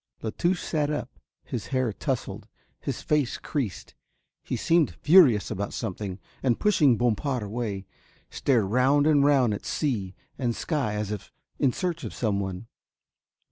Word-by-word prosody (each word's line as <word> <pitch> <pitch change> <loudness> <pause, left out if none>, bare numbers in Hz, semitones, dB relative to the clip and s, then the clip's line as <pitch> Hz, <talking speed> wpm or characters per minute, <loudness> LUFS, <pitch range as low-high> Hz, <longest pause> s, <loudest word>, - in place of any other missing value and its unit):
La 110 - -2
Touche 175 - 0
sat 150 -3 0
up, 150 - -4 0.2
his 120 - -5
hair 130 -5 0
towsled, - - -3 0.3
his - - -4
face 150 -5 +1
creased, 130 -10 -4 0.5
he - - -3
seemed 165 -2 +2
furious 145 - +5
about 100 0 -3
something 100 -3 -4 0.2
and 125 -3 +1
pushing 150 - +4
Bompard 120 +1 0
away 105 -2 -4 0.5
stared 120 -7 +2
round 130 +7 +3
and 150 -2 +5
round 135 -6 +4
at 105 - -5
sea 105 - -2 0.2
and 120 -3 0
sky 135 -10 -1
as 105 0 -2
if 105 - -6 0.3
in 135 - +3
search 175 +1 -3
of 105 -9 -6
someone. 100 -2 -2
120 Hz, 145 wpm, -26 LUFS, 105-145 Hz, 0.5 s, furious